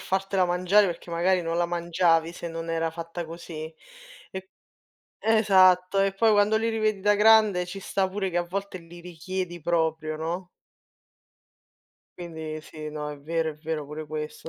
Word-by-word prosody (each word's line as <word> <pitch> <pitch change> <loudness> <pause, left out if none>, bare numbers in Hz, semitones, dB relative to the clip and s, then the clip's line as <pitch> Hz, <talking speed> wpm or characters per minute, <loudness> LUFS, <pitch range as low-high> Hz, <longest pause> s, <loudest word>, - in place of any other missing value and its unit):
fartela 190 0 0
mangiare, 180 +3 +3
perché 175 -1 -6
magari 175 +2 +2
non 165 0 -2
la 175 - +1
mangiavi 170 -1 +1
se 175 - -7
non 165 0 -5
era 165 0 0
fatta 170 +1 -6
così, 160 -1 -8 0.6
e 190 0 -8 0.7
esatto 190 -4 +4
e 195 0 +2
poi 220 +3 +3
quando 205 +1 +4
li 225 +1 +1
rivedi 215 -3 0
da 205 +1 +4
grande 210 -3 +5
ci 180 +2 -7
sta 190 0 0
pure 195 0 -2
che 175 - -2
a 175 - +1
volte 195 +1 -4
li 170 0 -13
richiedi 180 +1 -5
proprio, 160 -1 0
no? 175 +3 -4 1.7
Quindi 160 -3 -6
sì, 155 0 -8
no, 150 0 -5
è 145 - -8
vero, 160 +2 -1
è - - -10
vero 155 0 -4
pure 150 +1 -7
questo. 155 +1 -6
175 Hz, 165 wpm, -26 LUFS, 165-190 Hz, 1.7 s, grande